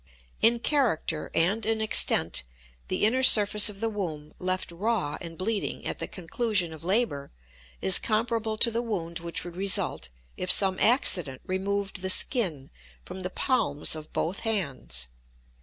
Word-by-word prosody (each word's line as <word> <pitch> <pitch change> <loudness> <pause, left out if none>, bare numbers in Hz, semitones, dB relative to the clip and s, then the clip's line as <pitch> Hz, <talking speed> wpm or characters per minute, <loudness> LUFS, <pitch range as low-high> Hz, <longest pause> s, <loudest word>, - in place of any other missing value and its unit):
In 230 +2 +4
character 230 - -1
and 195 +7 +1
in 220 +1 0
extent 220 0 +3 0.5
the - - 0
inner 250 +4 +1
surface 210 -4 +7
of 200 0 -9
the 225 - 0
womb, 165 -9 -6
left 185 -1 -3
raw 195 -3 -2
and 165 -1 -9
bleeding 205 +2 -3
at - - -4
the - - -4
conclusion 190 -1 -2
of 160 0 -12
labor, 185 -7 0 0.5
is 95 - +4
comparable 225 0 -2
to 235 - +3
the 230 +1 -2
wound 175 -8 -4
which 170 0 -3
would 175 -1 -9
result 185 - -2 0.3
if 180 - -5
some 190 -2 +4
accident 175 - +1
removed 195 +1 -3
the 190 - -2
skin 185 - +2 0.3
from 190 - -8
the 180 - -4
palms 160 - 0
of 155 0 -10
both 180 +5 -3
hands. 140 - -3
195 Hz, 155 wpm, -26 LUFS, 165-225 Hz, 0.5 s, surface